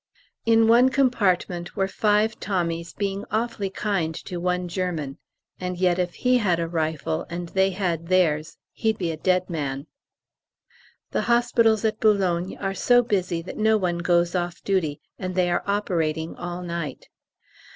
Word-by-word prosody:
In 225 0 +5
one 240 +3 +6
compartment 195 -10 +1
were 195 - +1
five 210 +2 +1
Tommies 170 -3 -2
being 200 0 -3
awfully 215 -2 -1
kind 190 -5 -1
to 180 - -5
one 180 +1 -1
German; 170 -6 -3 0.4
and 180 -1 -3
yet 180 0 +2
if 180 -1 -1
he 250 0 +2
had 180 -6 +1
a 165 - -1
rifle, 155 - -2
and 170 0 -5
they 190 +1 +2
had 175 -4 -2
theirs, 160 -4 +1
he'd 220 -1 0
be 170 -3 -1
a - - -4
dead 185 +2 +1
man. 140 -5 -3 1.3
The - - 0
hospitals 235 -2 +3
at 215 0 0
Boulogne 190 -4 +1
are 195 0 -2
so 245 +4 +4
busy 180 -6 -1
that 185 - -8
no 220 0 +4
one 175 -4 -1
goes 170 0 +2
off 175 -1 -3
duty, 170 -7 0 0.2
and 185 -1 -4
they 180 -1 +2
are 175 - +1
operating 165 -6 -1
all 175 0 -5
night. 170 -6 -5
180 Hz, 160 wpm, -24 LUFS, 170-205 Hz, 1.3 s, one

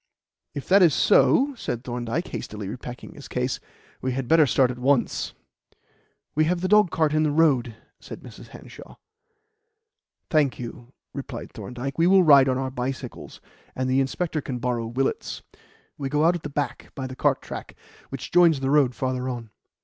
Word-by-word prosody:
"If 140 - -6
that 195 +2 +6
is 165 -6 +5
so," 275 +6 +4
said 120 - -5
Thorndyke, 120 +6 -3
hastily 105 -2 -6
repacking 125 +3 -8
his - - -11
case, - - -2 0.4
"we 130 0 -1
had 130 -1 -3
better 160 +1 +5
start 130 +1 +3
at 125 - -8
once." 130 0 +1 1.0
"We 155 +1 +2
have 175 +2 0
the 185 - 0
dogcart 175 -7 +3
in 155 - +2
the 155 - +2
road," 140 -7 +2 0.2
said - - -10
Mrs. - - -12
Hanshaw. - - -13 1.4
"Thank 150 -5 +2
you," 120 0 -9 0.2
replied 135 -4 -7
Thorndyke. 125 +7 -6
"We 170 - +4
will 190 0 +6
ride 140 -4 +7
on 130 - +1
our 130 0 -3
bicycles, 130 0 -6 0.3
and 130 0 -1
the 130 +1 +2
inspector 155 +3 -2
can 130 -2 -4
borrow 120 -2 -2
Willett's. 130 +4 -2 0.6
We 135 -1 -3
go 150 +2 +2
out 170 - +5
at 175 - -4
the - - -6
back 140 -4 -4
by 135 - -4
the 130 0 -7
cart - - +1
track, - - -8 0.3
which - - -7
joins 170 -4 +5
the 135 0 -1
road 140 -4 +3
farther 130 0 -2
on." 120 -3 -6
135 Hz, 175 wpm, -24 LUFS, 125-155 Hz, 1.4 s, ride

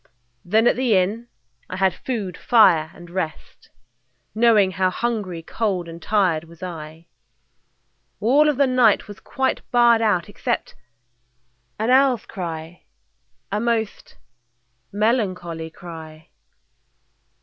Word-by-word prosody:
Then 220 +5 +2
at - - +4
the 250 -4 +2
inn 210 +6 -1 0.4
I 185 - -5
had 190 -1 +2
food, 210 -9 -4
fire, 180 -11 +4
and 175 - -12
rest, 170 -4 -6 0.6
Knowing 215 -4 +4
how 185 +1 +1
hungry, 200 -6 -3
cold, 190 -3 -2
and 165 0 -10
tired 180 -5 +1
was 170 +1 -14
I. 160 -2 -8 1.1
All 275 +8 +4
of 290 - 0
the 280 - +4
night 250 -6 +3
was 205 0 -10
quite 265 +4 -2
barred 235 -2 +4
out 210 -6 +1
except 235 +4 -3 1.0
An 220 +3 0
owl's 260 -3 +4
cry, 165 -3 -7 0.7
a 205 - 0
most 225 -2 -2 0.7
melancholy 185 -7 -1
cry. 160 -2 -11
200 Hz, 115 wpm, -22 LUFS, 170-235 Hz, 1.1 s, at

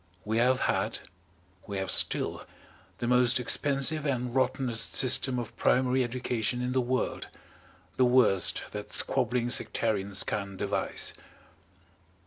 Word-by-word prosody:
We 110 +2 0
have 125 +2 +2
had - - -1 0.7
we 100 - -4
have 95 0 -2
still - - 0 0.5
the 120 - -4
most 125 0 +3
expensive 140 +4 +1
and 125 -4 -2
rottenest 130 -3 0
system 130 0 +3
of 120 -3 -5
primary 130 0 +2
education 125 -1 -2
in 125 0 -2
the 130 0 +1
world, 130 +1 -2 0.7
the 130 - +4
worst 120 -7 +3
that 105 0 -7
squabbling 120 -1 +1
sectarians 100 -5 0
can 100 -2 -4
devise. - - -1
125 Hz, 120 wpm, -28 LUFS, 110-130 Hz, 0.7 s, the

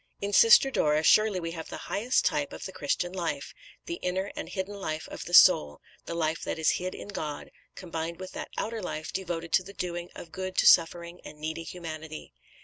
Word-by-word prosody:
In 200 0 -3
Sister 230 +6 +7
Dora, 150 - +2
surely 215 +2 +5
we 165 -1 -4
have 165 -1 -7
the - - -6
highest 230 +6 +1
type 145 -1 0
of - - -7
the 190 - -5
Christian 175 +3 -2
life, 175 -3 -3 0.3
the 340 0 -5
inner 190 +2 -2
and - - -6
hidden 190 +1 -4
life 160 -6 -4
of - - -7
the - - -8
soul, 75 -1 +7 0.3
the 170 - -4
life 160 -1 -1
that - - -3
is 160 - +3
hid 185 0 -4
in - - -9
God, 155 -7 -5 0.2
combined 165 -1 -5
with 185 0 -7
that - - -6
outer 225 0 -3
life 160 -4 -5
devoted 170 -3 -4
to 190 - +4
the 200 +2 -11
doing 175 -2 -4
of 165 - -10
good 185 0 -5
to - - +4
suffering 170 +1 +4
and - - -10
needy 155 +2 -4
humanity. 160 - -8
175 Hz, 210 wpm, -28 LUFS, 160-190 Hz, 0.3 s, Sister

